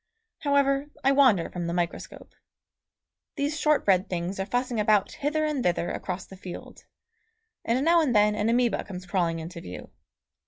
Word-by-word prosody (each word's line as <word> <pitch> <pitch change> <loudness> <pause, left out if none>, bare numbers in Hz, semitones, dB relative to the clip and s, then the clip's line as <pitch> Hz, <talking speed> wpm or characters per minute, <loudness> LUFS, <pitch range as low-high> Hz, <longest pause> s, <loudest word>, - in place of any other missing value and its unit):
However, 280 -1 +2 0.2
I 270 - +4
wander 255 -11 +4
from 175 -1 -4
the 170 - -2
microscope. 175 -1 -4 1.0
These 290 +1 -2
shortbread 205 - +2
things 180 +2 -3
are 190 - -2
fussing 245 +1 -1
about 210 -1 +3
hither 305 +2 -1
and 295 -4 -1
thither 175 -1 0
across 185 0 -5
the 190 - -12
field, 185 -2 -10 0.8
and 255 +5 0
now 335 0 +5
and 265 -7 0
then 210 0 +5
an 210 +1 0
amoeba 240 -2 +1
comes 185 -1 -8
crawling 175 -2 0
into 165 +1 -7
view. 90 - -9
210 Hz, 160 wpm, -26 LUFS, 180-275 Hz, 1.0 s, now